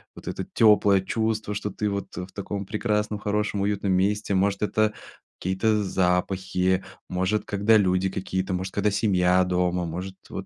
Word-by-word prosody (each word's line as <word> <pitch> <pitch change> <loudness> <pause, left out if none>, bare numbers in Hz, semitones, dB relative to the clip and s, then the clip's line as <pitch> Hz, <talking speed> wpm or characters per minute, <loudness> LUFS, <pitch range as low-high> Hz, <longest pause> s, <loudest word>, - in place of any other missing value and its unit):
вот - - -12
это - - -4
тёплое 105 -3 +5
чувство, 110 0 -2
что 105 0 -3
ты 105 +1 -2
вот 100 0 -5
в 90 +1 -5
таком 100 0 -5
прекрасном, 105 -1 -1
хорошем, 105 -1 -1
уютном 100 -1 0
месте? 100 +2 +1
Может, 100 +1 +1
это 105 0 +1 0.5
какие-то 105 +3 +1
запахи, 95 0 0 0.3
может 95 +4 0
когда 105 +2 +3
люди 95 -1 +2
какие-то, 95 0 -3
может 95 +1 -3
когда 105 0 +1
семья 95 -3 +3
дома? 90 -1 0
Может 90 +3 -5
вот - - -6
100 Hz, 155 wpm, -25 LUFS, 95-105 Hz, 0.5 s, тёплое